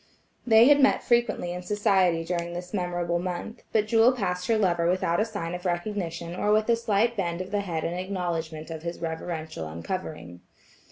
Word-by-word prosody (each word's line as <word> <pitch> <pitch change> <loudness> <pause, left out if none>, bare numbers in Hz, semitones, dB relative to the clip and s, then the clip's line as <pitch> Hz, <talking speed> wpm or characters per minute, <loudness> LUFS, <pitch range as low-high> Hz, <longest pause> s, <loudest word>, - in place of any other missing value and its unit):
They 225 +1 +7
had 290 0 +6
met 270 - +4
frequently 235 -7 +1
in 180 - -5
society 185 -3 +2
during 170 0 -3
this 180 +2 -7
memorable 175 -2 -1
month, 180 +6 -5
but 215 -1 +2
Jewel 225 +3 +5
passed 180 -7 -2
her 225 -2 +3
lover 175 -4 +2
without 175 -2 +1
a 215 - +2
sign 205 -7 -5
of 180 0 -5
recognition 175 -2 -3
or 205 +3 0
with 215 0 +3
a 235 - +5
slight 230 0 +1
bend 170 -4 -2
of 185 +1 -6
the 205 -1 0
head 165 -5 -3
in 170 - -2
acknowledgment 170 -4 -3
of 160 -1 -6
his 170 +1 -5
reverential 160 - -4
uncovering. 90 - -6
180 Hz, 185 wpm, -26 LUFS, 170-210 Hz, -, They